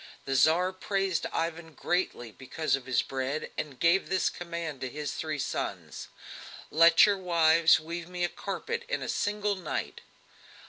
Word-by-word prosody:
The 135 - -2
Tsar 175 +7 +3
praised 195 -2 -1
Ivan 165 -1 -3
greatly 175 -10 -2
because 135 +7 -2
of 135 -2 -9
his 130 -3 +2
bread, 135 +3 -3
and 140 -5 -5
gave 170 +3 +3
this 185 -1 +1
command 170 -5 -6
to 130 - -3
his 145 +1 -4
three 155 -1 -3
sons: 140 - -4 0.6
"Let 165 +2 +7
your 200 -2 +1
wives 165 -3 +4
weave 170 +2 -6
me 180 -1 -3
a - - +3
carpet 205 - -4
in - - -2
a - - -4
single 210 0 -1
night." 180 -5 -4
165 Hz, 155 wpm, -29 LUFS, 150-180 Hz, 0.6 s, Let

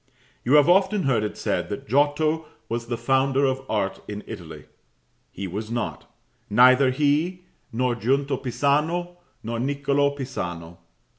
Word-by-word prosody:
You 130 +5 +3
have 145 -1 +6
often 190 +3 +3
heard 130 -6 +2
it 105 - -4
said - - -2
that - - -6
Giotto 150 +5 +1 0.2
was 115 0 -4
the 120 0 -2
founder 135 +2 +2
of 130 0 0
art 100 -3 -1
in 105 0 -6
Italy. 80 -8 -9 0.7
He 100 - -6
was 105 +4 -5
not: 120 -1 -4 0.4
neither 130 +4 +6
he, 150 +7 0 0.3
nor 125 +1 0
Giunta 135 +4 0
Pisano, 150 +8 0 0.3
nor 115 +1 -3
Niccolo 140 +2 +1
Pisano. 90 -11 -6
130 Hz, 140 wpm, -24 LUFS, 115-145 Hz, 0.7 s, have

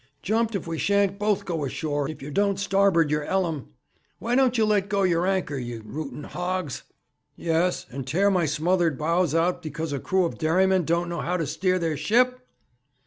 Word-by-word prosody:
'Jumped 225 +1 0
if 195 - -3
we 165 -1 -4
shan't 200 0 +1
both 210 -1 0
go 165 -4 -2
ashore 145 +1 -2
if 155 -3 -8
yer 145 - -6
don't 200 +4 +1
starboard 195 -5 +3
yer 150 0 +1
'ellum. 170 - -1 0.5
Why 235 +2 -3
don't 255 -1 +3
you 220 - +4
let 205 -2 +1
go 200 -1 +1
yer 175 -1 +2
anchor, 185 -7 -1
you 120 -2 -6
rooting 150 +2 -6
hogs?' 180 -4 -3 0.5
'Yes, 170 +2 0
and 135 +1 -6
tear 195 +9 +2
my 180 -4 +2
smothered 165 +1 +1
bows 165 0 +1
out 175 +2 +1
because 155 -1 -4
a 140 - -2
crew 190 +4 +1
of 170 - -5
dairymen 185 +2 +2
don't 170 +2 +1
know 170 0 -3
how 180 +1 -1
to 165 - -1
steer 185 +5 0
their 165 -4 -1
ship!' 250 - +2
175 Hz, 195 wpm, -25 LUFS, 155-195 Hz, 0.5 s, you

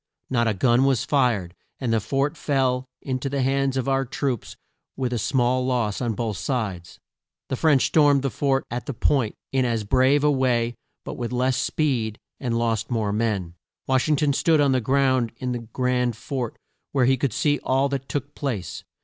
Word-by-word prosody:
Not 120 -2 +2
a 110 - +1
gun 120 +5 +3
was 135 -4 +2
fired, 120 - +1 0.3
and 120 -4 -1
the 115 - +3
fort 140 +8 -1
fell 130 -4 0 0.2
in 130 -2 -2
to 135 - -3
the 140 -1 -1
hands 135 0 +1
of 130 - -1
our 135 0 +2
troops 130 -2 -3 0.4
with 130 -2 -1
a 120 - -1
small 125 +2 +1
loss 120 -5 0
on 115 -3 -1
both 110 -2 -2
sides. 105 - -3 0.5
The - - 0
French 145 -1 +3
stormed 145 -3 +4
the 135 - 0
fort 135 -2 0
at 120 0 -4
the 140 - -4
Point 125 -3 +1 0.2
in 135 -1 +2
as 115 -3 0
brave 130 +6 +3
a 150 - +4
way, 120 -3 +1 0.3
but - - -6
with 120 -1 -3
less 125 +1 +1
speed, 120 -8 0 0.2
and 120 -4 -1
lost 115 -1 0
more 110 -4 0
men. 105 -6 -1 0.3
Wash 130 +3 +1
ing 150 - +4
ton 145 0 +1
stood 160 +2 +3
on 140 -2 +4
the 130 -1 +2
ground 130 -1 +2
in 125 0 -3
the 120 - -2
grand 125 +1 -1
fort 125 -1 -4 0.4
where 135 -3 +3
he 130 +1 +4
could 130 0 -1
see 145 +6 +1
all 135 +2 +2
that 135 -1 -4
took 145 0 -3
place. 120 -11 -4
130 Hz, 200 wpm, -24 LUFS, 115-135 Hz, 0.5 s, stormed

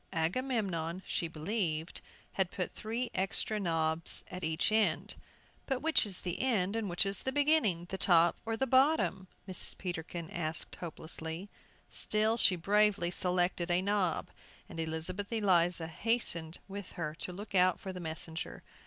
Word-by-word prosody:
Agamemnon, 185 -2 -1
she 170 - -1
believed, 165 -1 -2 0.3
had 190 -2 +1
put 180 -1 -4
three 230 +3 -3
extra 195 +3 0
knobs 165 -3 +1
at 180 0 -6
each 160 +6 +2
end. 210 -7 +1 0.5
"But 265 -1 -1
which 320 -8 +5
is 190 -3 -4
the 175 -2 -3
end, 215 -6 +1
and 220 -3 -1
which 175 +4 +2
is 195 0 -2
the 265 - -1
beginning, 280 - +2
the 190 - -4
top 170 -2 +5
or 225 0 -2
the 265 - +1
bottom?" 260 -8 +3 0.2
Mrs. 185 -2 +1
Peterkin 170 -2 -5
asked 160 -2 -3
hopelessly. 160 +2 -4 0.4
Still 215 +1 +2
she 195 -4 +5
bravely 200 0 +3
selected 180 -1 +1
a 175 0 +3
knob, 200 -4 0 0.4
and 165 - -8
Elizabeth 165 +6 -3
Eliza 180 -6 +2
hastened 170 -3 0
with 200 -1 -7
her 155 -3 -3
to - - -3
look 200 +4 -9
out 185 -1 +4
for 190 - -6
the 180 - -6
messenger. 160 0 -3
185 Hz, 155 wpm, -32 LUFS, 170-210 Hz, 0.5 s, which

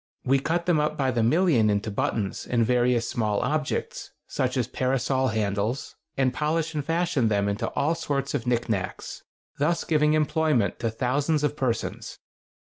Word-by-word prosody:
We 135 +2 +3
cut 170 +5 -1
them 175 -3 +3
up 150 0 0
by 135 -2 +1
the 120 - 0
million 120 - +3
into 105 +1 0
buttons 100 0 -2
and 120 -2 +2
various 120 -1 +2
small 105 -3 0
objects, 150 +3 -2 0.2
such - - -1
as - - 0
parasol 130 0 0
handles, 110 +3 -2 0.2
and 130 -2 +2
polish 160 +1 -1
and 150 -2 -2
fashion 165 -5 +1
them 100 -2 +1
into 100 +1 -1
all 155 +4 +1
sorts 140 -4 -2
of 115 - -2
knickknacks, 115 -5 -2 0.4
thus 165 +4 +1
giving 150 -1 +2
employment 155 -6 +1
to 115 - 0
thousands 140 +7 0
of 150 0 0
persons. 130 -5 -3
130 Hz, 160 wpm, -26 LUFS, 115-150 Hz, 0.4 s, We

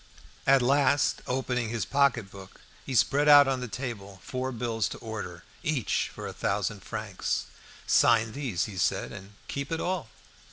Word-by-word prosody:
At 135 -1 +6
last, 140 +2 +3
opening 125 -2 -1
his 115 0 -2
pocket 135 -8 +2
book, 95 -1 -12 0.3
he 135 - -3
spread 145 +5 +3
out 145 -1 +9
on 135 -1 0
the 125 - -4
table 105 -6 -6
four 130 0 -3
bills 115 -3 -1
to - - -7
order, 100 -7 -7 0.2
each 150 -7 0
for - - -8
a - - -5
thousand - - -1
francs. - - -3 0.4
"Sign 115 -1 +4
these," 120 - -2
he 95 -3 -7
said, - - 0
"and 95 +2 -10
keep 140 +1 -4
it 165 - -1
all!" 180 -10 -2
125 Hz, 165 wpm, -28 LUFS, 110-140 Hz, 0.4 s, out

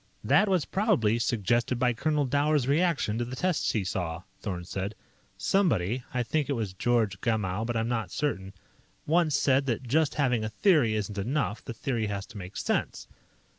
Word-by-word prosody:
"That 210 - +4
was 185 -6 +2
probably 165 - +1
suggested 120 +1 +1
by 125 0 +2
Colonel 150 +4 0
Dower's 145 0 +1
reaction 145 -7 +1
to - - 0
the 125 +2 -6
tests 180 +3 0
he 105 - 0
saw," 90 -2 -3 0.2
Thorn 90 -4 -4
said. 95 +3 -4 0.4
"Somebody 125 - +1
I 125 -1 0
think 145 +4 -1
it - - +2
was 110 -7 -3
George 110 -2 0
Gamow, 105 -3 0
but 120 -1 -1
I'm 115 0 0
not 115 -6 -2
certain 95 -6 -2 0.5
once 160 -2 +2
said 135 0 +2
that 125 +1 -1
just 155 +4 +2
having 125 -6 +1
a 110 - -2
theory 140 - +3
isn't 105 -1 -3
enough; 125 +1 -1
the 115 - -7
theory 115 -2 -1
has 100 -1 -4
to - - -9
make 95 +1 -8
sense. - - -2
120 Hz, 180 wpm, -28 LUFS, 105-145 Hz, 0.5 s, That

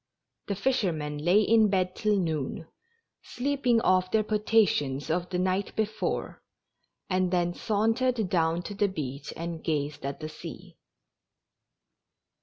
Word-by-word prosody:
The 200 - -1
fishermen 175 - -1
lay 175 +7 +4
in 220 -1 +4
bed 185 -2 0
till 210 -2 +1
noon, 160 -4 -2 0.6
sleeping 255 -2 0
off 185 -2 +3
their 220 +1 +2
potations 200 - +1
of 175 +2 -1
the 180 - -2
night 185 +2 0
before, 215 0 -2 0.7
and 185 -1 +1
then 175 -1 +1
sauntered 225 +3 +1
down 165 -1 +1
to 205 - -6
the 205 +1 +2
beach, 140 -7 -5
and 170 -1 -5
gazed 145 -2 -2
at 140 0 -4
the 155 - -5
sea. - - -10
185 Hz, 130 wpm, -28 LUFS, 160-215 Hz, 0.7 s, lay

